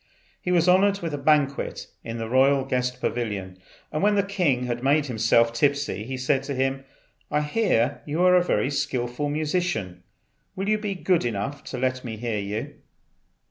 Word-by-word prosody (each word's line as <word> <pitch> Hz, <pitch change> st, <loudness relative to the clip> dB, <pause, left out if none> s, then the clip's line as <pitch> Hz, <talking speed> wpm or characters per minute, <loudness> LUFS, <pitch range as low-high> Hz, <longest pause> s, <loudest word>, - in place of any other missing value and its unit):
He 180 Hz, -, -2 dB
was 175 Hz, -1 st, +3 dB
honoured 195 Hz, +2 st, +4 dB
with 165 Hz, -3 st, -3 dB
a -, -, -1 dB
banquet 140 Hz, -1 st, +1 dB, 0.2 s
in 115 Hz, 0 st, -5 dB
the 115 Hz, -1 st, -4 dB
royal 135 Hz, +2 st, +3 dB
guest 125 Hz, -1 st, -1 dB
pavilion, 100 Hz, -7 st, -3 dB, 0.3 s
and 155 Hz, -, -2 dB
when 205 Hz, +1 st, +3 dB
the 200 Hz, -, +3 dB
king 180 Hz, -11 st, 0 dB
had 120 Hz, -1 st, -3 dB
made 145 Hz, +2 st, +3 dB
himself 115 Hz, -1 st, +2 dB
tipsy 140 Hz, -5 st, 0 dB
he 130 Hz, +2 st, -4 dB
said 130 Hz, +1 st, +1 dB
to 140 Hz, -, -3 dB
him, 135 Hz, +1 st, -1 dB, 0.4 s
"I 150 Hz, 0 st, +1 dB
hear 150 Hz, -, +1 dB
you 155 Hz, +4 st, 0 dB
are 180 Hz, 0 st, +6 dB
a 180 Hz, -, +6 dB
very 145 Hz, -5 st, 0 dB
skilful 135 Hz, -1 st, -2 dB
musician. 150 Hz, -, -2 dB, 0.5 s
Will 195 Hz, +1 st, -3 dB
you 215 Hz, 0 st, +2 dB
be 205 Hz, -2 st, -3 dB
good 180 Hz, -1 st, +1 dB
enough 120 Hz, +5 st, -3 dB
to 130 Hz, -, -5 dB
let 130 Hz, 0 st, -1 dB
me 115 Hz, -3 st, -5 dB
hear 115 Hz, -2 st, -2 dB
you?" 100 Hz, +2 st, -4 dB
135 Hz, 180 wpm, -25 LUFS, 120-160 Hz, 0.5 s, are